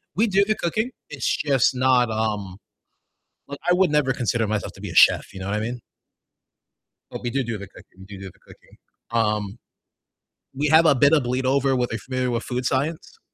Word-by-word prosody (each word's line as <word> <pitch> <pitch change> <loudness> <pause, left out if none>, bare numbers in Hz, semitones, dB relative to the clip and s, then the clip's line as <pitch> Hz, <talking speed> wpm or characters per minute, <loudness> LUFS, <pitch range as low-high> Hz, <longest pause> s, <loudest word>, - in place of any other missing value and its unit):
We 220 +5 +2
do 200 -1 +3
the 215 - +1
cooking. 220 +9 -2 0.2
It's 145 -5 -1
just 135 -3 +2
not, 125 -1 +3
um 105 -4 -3 0.9
like, 140 0 -8
I 175 - +5
would 180 -3 +2
never 150 -3 +2
consider 120 -2 -1
myself 105 0 -3
to - - -15
be - - -6
a - - -8
chef, - - +5
you 95 - -9
know 95 - -5
what 100 - -1
I - - -1
mean? 120 +3 -4 1.3
But - - -7
we 120 - -1
do 135 +2 -1
do 115 -2 -4
the 100 0 -9
cooking 95 -1 -17
do 100 -1 -10
do 95 -2 -9
the - - -29
cooking. - - -20 0.3
Um, 105 -2 -1 1.0
we 145 +3 0
have 160 +2 +5
a 145 - +5
bit 140 +4 +4
of 150 - +4
bleed 125 +2 -2
over 135 0 +2
with 125 -1 -1
are - - -2
you 110 - -4
familiar 130 0 -3
with 115 0 -2
food 125 0 -4
science? 155 - -2
125 Hz, 215 wpm, -23 LUFS, 110-145 Hz, 1.3 s, I